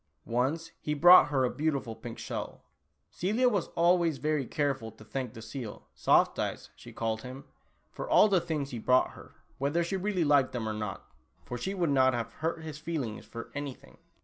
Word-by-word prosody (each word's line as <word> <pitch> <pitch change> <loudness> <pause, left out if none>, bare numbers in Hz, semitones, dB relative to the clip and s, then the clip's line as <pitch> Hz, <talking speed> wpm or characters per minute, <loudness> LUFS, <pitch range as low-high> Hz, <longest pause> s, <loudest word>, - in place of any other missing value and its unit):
Once 140 +8 -1
he 150 - -2
brought 175 +4 +8
her 140 -3 +1
a - - +1
beautiful 140 -7 -2
pink 115 +1 -8
shell. - - -6 0.5
Celia 220 +8 +1
was 205 -8 +1
always 170 -2 +3
very 150 -1 -1
careful 135 -6 -1
to 110 - -15
thank 130 -1 -4
the 115 - -9
seal 115 -1 -7
(Soft - - +3
Eyes, - - -3
she - - -12
called 110 -1 -2
him) 130 +3 -8 0.5
for - - -6
all - - +7
the 190 -4 +3
things 155 -5 -3
he 120 - -4
brought 125 +3 +3
her, - - -14 0.2
whether 145 +5 +1
she 190 +3 -2
really 190 -2 0
liked 145 -3 +3
them 115 -3 -3
or 110 - -2
not, 105 -2 -5 0.4
for 125 - -5
she 190 +11 -3
would 170 -5 +1
not 130 -2 +4
have 115 -2 -4
hurt 165 0 -3
his 155 -2 -7
feelings 150 -9 -4
for 115 - -8
anything. 145 -3 -7
140 Hz, 195 wpm, -30 LUFS, 120-165 Hz, 0.5 s, brought